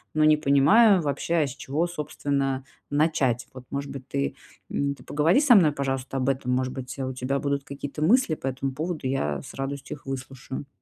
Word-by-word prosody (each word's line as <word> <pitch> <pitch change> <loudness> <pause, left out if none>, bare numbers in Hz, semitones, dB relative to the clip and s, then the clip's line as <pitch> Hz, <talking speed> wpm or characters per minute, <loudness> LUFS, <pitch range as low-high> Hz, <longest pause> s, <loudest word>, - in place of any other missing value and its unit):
но 155 - +3
не 155 0 +6
понимаю 170 +9 +5
вообще, 145 +4 -1
а - - -1
с 135 - -7
чего, 145 +5 -1
собственно, 140 -4 -2 0.3
начать. 145 -5 +1
Вот, 130 -1 -10
может 140 0 -4
быть, 135 -2 -8
ты, 70 0 -2 0.4
м, 140 0 0
ты - - -16
поговори 160 - +3
со 260 -6 +7
мной, 160 -7 +6
пожалуйста, 135 -1 -3
об 130 +1 +1
этом, 130 -2 0
может 130 0 0
быть, 130 +1 -7
у 130 0 -2
тебя 130 +2 -1
будут 140 -1 -1
какие-то 140 +2 -6
мысли 190 -1 +4
по 135 - -6
этому 135 +1 -2
поводу, 155 -1 -3
я 75 - -1
с - - -11
радостью 135 +1 -5
их - - -25
выслушаю. 135 +1 -6
140 Hz, 200 wpm, -26 LUFS, 130-150 Hz, 0.4 s, со